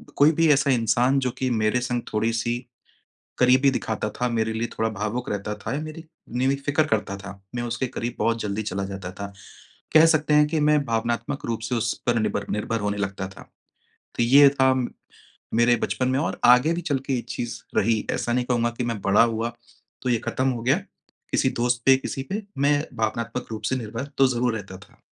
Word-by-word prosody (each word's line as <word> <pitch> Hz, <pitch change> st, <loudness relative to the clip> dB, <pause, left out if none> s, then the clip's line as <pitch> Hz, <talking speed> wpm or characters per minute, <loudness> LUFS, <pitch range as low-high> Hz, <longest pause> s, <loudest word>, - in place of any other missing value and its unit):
कोई 145 Hz, +3 st, +6 dB
भी 165 Hz, +1 st, +2 dB
ऐसा 140 Hz, 0 st, +2 dB
इंसान, 120 Hz, +3 st, +2 dB
जो 130 Hz, -2 st, -1 dB
कि 130 Hz, +1 st, -2 dB
मेरे 110 Hz, +1 st, +1 dB
संग 125 Hz, -1 st, -1 dB
थोड़ी 110 Hz, +2 st, +1 dB
सी 120 Hz, +1 st, -1 dB, 0.8 s
करीबी 130 Hz, +2 st, +5 dB
दिखाता 110 Hz, -3 st, -2 dB
था, 125 Hz, +4 st, -2 dB
मेरे 110 Hz, -1 st, 0 dB
लिए 115 Hz, +1 st, -2 dB
थोड़ा 110 Hz, 0 st, +1 dB
भावुक 110 Hz, +4 st, -2 dB
रहता 105 Hz, +1 st, -3 dB
था 105 Hz, -, -5 dB
या 145 Hz, -, -1 dB
मेरी 155 Hz, +1 st, -7 dB, 0.3 s
मेरी 130 Hz, +4 st, +1 dB
फ़िक्र 145 Hz, +2 st, +2 dB
करता 100 Hz, -6 st, -1 dB
था, 100 Hz, 0 st, -10 dB, 0.2 s
मैं 120 Hz, -, -2 dB
उसके 120 Hz, +2 st, -2 dB
करीब 120 Hz, 0 st, -4 dB
बहुत 115 Hz, 0 st, +1 dB
जल्दी 105 Hz, +1 st, -2 dB
चला 100 Hz, -1 st, -3 dB
जाता 95 Hz, -1 st, -6 dB
था। 100 Hz, -, -3 dB, 0.7 s
कह 160 Hz, +1 st, +8 dB
सकते 155 Hz, -2 st, +3 dB
हैं 150 Hz, 0 st, +5 dB
कि 155 Hz, 0 st, -1 dB
मैं 150 Hz, 0 st, +4 dB
भावनात्मक 115 Hz, +4 st, -2 dB
रूप 115 Hz, -1 st, -2 dB
से 125 Hz, -, 0 dB
उस 115 Hz, 0 st, 0 dB
पर 120 Hz, -1 st, +3 dB
निबर 105 Hz, -1 st, -1 dB
निर्भर 105 Hz, +2 st, -1 dB
होने 105 Hz, 0 st, -1 dB
लगता 95 Hz, -1 st, -3 dB
था। 95 Hz, -, -13 dB, 0.8 s
तो -, -, +2 dB
ये 140 Hz, +4 st, +7 dB
था 130 Hz, -1 st, +3 dB, 0.8 s
मेरे 120 Hz, +1 st, +4 dB
बचपन 130 Hz, +2 st, -1 dB
में 130 Hz, +1 st, +1 dB
और 165 Hz, -, -2 dB
आगे 125 Hz, +7 st, +6 dB
भी 175 Hz, -, -2 dB
चल 145 Hz, -5 st, 0 dB
के 135 Hz, -, -1 dB
ये 120 Hz, -, -1 dB
चीज़ 120 Hz, -1 st, -4 dB, 0.2 s
रही, 110 Hz, +1 st, +2 dB
ऐसा 120 Hz, -, -1 dB
नहीं 125 Hz, 0 st, +1 dB
कहूँगा 120 Hz, -1 st, +1 dB
कि 125 Hz, -, -1 dB
मैं 115 Hz, -3 st, -3 dB
बड़ा 100 Hz, +3 st, +5 dB
हुआ, 115 Hz, 0 st, 0 dB, 0.5 s
तो 130 Hz, -, -2 dB
ये 120 Hz, -, +3 dB
खत्म 130 Hz, +1 st, 0 dB
हो 120 Hz, -3 st, -4 dB
गया। 130 Hz, +3 st, +3 dB, 0.5 s
किसी -, -, +2 dB
दोस्त 120 Hz, 0 st, +1 dB
पे, 135 Hz, 0 st, +8 dB
किसी 135 Hz, 0 st, -4 dB
पे, 210 Hz, +2 st, -2 dB, 0.2 s
मैं 145 Hz, +1 st, +3 dB
भावनात्मक 115 Hz, +2 st, -2 dB
रूप 110 Hz, -1 st, -5 dB
से -, -, +2 dB
निर्भर 115 Hz, +1 st, -4 dB
तो 135 Hz, -, +6 dB
ज़रूर 125 Hz, -2 st, 0 dB
रहता 95 Hz, -2 st, -8 dB
था। -, -, -19 dB
120 Hz, 210 wpm, -24 LUFS, 110-130 Hz, 0.8 s, कह